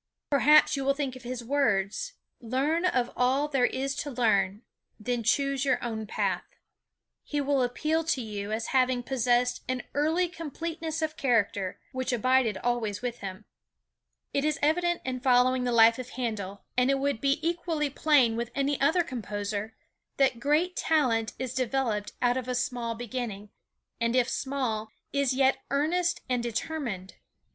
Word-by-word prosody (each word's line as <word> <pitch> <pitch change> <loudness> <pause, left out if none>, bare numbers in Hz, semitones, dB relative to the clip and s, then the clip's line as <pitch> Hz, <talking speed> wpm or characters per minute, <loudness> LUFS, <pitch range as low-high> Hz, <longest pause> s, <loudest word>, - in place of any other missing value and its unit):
Perhaps 300 +2 +6
you 275 - -2
will 275 +1 +2
think 275 -3 -3
of 255 - -10
his 245 0 -5
words: 230 - 0 0.3
"Learn 275 +9 0
(of) 250 -8 +1
all 265 +4 +2
there 270 -4 +2
is 270 +1 -2
to 290 - -3
learn, 215 -5 +1 0.4
then 240 +2 -1
choose 275 +4 +1
your 265 -2 +2
own 220 -2 -3
path." - - -1 0.8
He 295 - -2
will 280 -1 +1
appeal 305 +6 0
to 320 -5 +1
you 210 -3 -5
as 225 +1 -2
having 255 -1 +2
possessed 245 -1 +1
an 255 -1 -2
"early 320 +5 +2
completeness 325 0 -4
of 310 0 -2
character," 220 -7 +1
which 260 0 -2
abided 245 -3 +2
always 235 -2 -1
with 240 -1 -3
him. 195 +1 -7 0.9
It 280 - +1
is 305 -1 +1
evident 345 +3 +2
in 255 -1 -2
following 250 0 +3
the 245 - 0
life 230 0 +6
of 250 -1 -6
Handel, 210 -6 -4
and 250 +1 +3
it 275 - +3
would 275 -4 -1
be 275 0 +2
equally 330 -4 -1
plain 270 -6 +3
with 235 0 -3
any 280 0 0
other 330 +5 +4
composer, 210 -4 -4 0.4
that 265 -4 +3
great 305 +7 +1
talent 240 -8 +1
is 255 -1 -4
developed 245 -5 -1
out 245 +1 +3
of 255 -1 -4
a 250 - -1
small 245 -2 -2
beginning, 225 -3 -5 0.5
and 230 +1 +1
if 250 -2 +3
small, 255 -6 -2 0.2
is 280 -2 +1
yet 265 0 +3
earnest 345 +5 +1
and 250 -1 0
determined. 235 - -4
255 Hz, 160 wpm, -28 LUFS, 230-280 Hz, 0.9 s, Perhaps